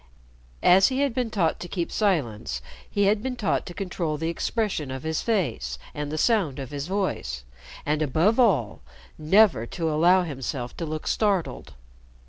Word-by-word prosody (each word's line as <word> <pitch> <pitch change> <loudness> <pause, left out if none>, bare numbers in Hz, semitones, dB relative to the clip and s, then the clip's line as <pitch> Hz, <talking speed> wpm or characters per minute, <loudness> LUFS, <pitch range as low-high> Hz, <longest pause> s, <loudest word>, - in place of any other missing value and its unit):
As 190 +2 +7
he 265 +1 -1
had 280 -4 +1
been 245 -2 -1
taught 175 -7 0
to 175 - -6
keep 175 -1 -3
silence, 155 - -1 0.3
he 205 - +1
had 205 +1 +3
been 255 +1 -3
taught 220 -5 -1
to 175 - -7
control 175 -5 -2
the 160 +2 -2
expression 175 - -2
of 130 0 -6
his 160 0 -1
face 120 - -1 0.2
and 150 0 -4
the 155 - -3
sound 190 - +2
of 135 -1 -6
his 145 +1 -4
voice, 180 - -2 0.4
and, 150 +1 0
above 165 - +2
all, 125 - +2 0.4
never 165 - +4
to 165 +3 -2
allow 175 +4 +4
himself 135 -5 -5
to 165 - -4
look 155 0 -5
startled. 170 - -1
165 Hz, 170 wpm, -25 LUFS, 145-205 Hz, 0.4 s, As